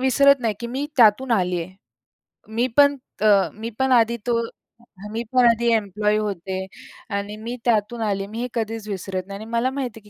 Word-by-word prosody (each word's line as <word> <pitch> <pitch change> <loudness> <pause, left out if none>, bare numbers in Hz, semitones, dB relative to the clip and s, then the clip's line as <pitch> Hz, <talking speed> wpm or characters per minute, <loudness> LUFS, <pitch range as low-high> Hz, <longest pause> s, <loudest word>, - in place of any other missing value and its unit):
विसरत 275 +1 +4
नाही 225 -3 0
की 235 - -4
मी 265 +4 -3
त्यातून 240 +2 +5
आली 180 -4 +1
आहे. 185 +3 -11 0.8
मी 240 +2 +2
पण, 285 0 +6 0.2
अ, 205 -2 +4
मी 225 +2 -6
पण 265 0 +2
आधी 235 -1 +4
तो 235 -1 +2 0.7
मी 230 - -2
पण 250 -1 +5
आधी 235 0 +3
एम्प्लॉयी 210 0 0
होते 190 -2 -3 0.5
आणि 205 +1 -4
मी 230 +3 -6
त्यातून 230 0 +1
आले, 200 -2 -1
मी 220 +3 -7
हे 250 - -2
कधीच 225 -1 -3
विसरत 190 -1 -4
नाही 200 0 -7
आणि 215 - -8
मला 235 +2 +1
माहिती 255 -4 -4
आहे 210 - -20
225 Hz, 190 wpm, -22 LUFS, 205-240 Hz, 0.8 s, पण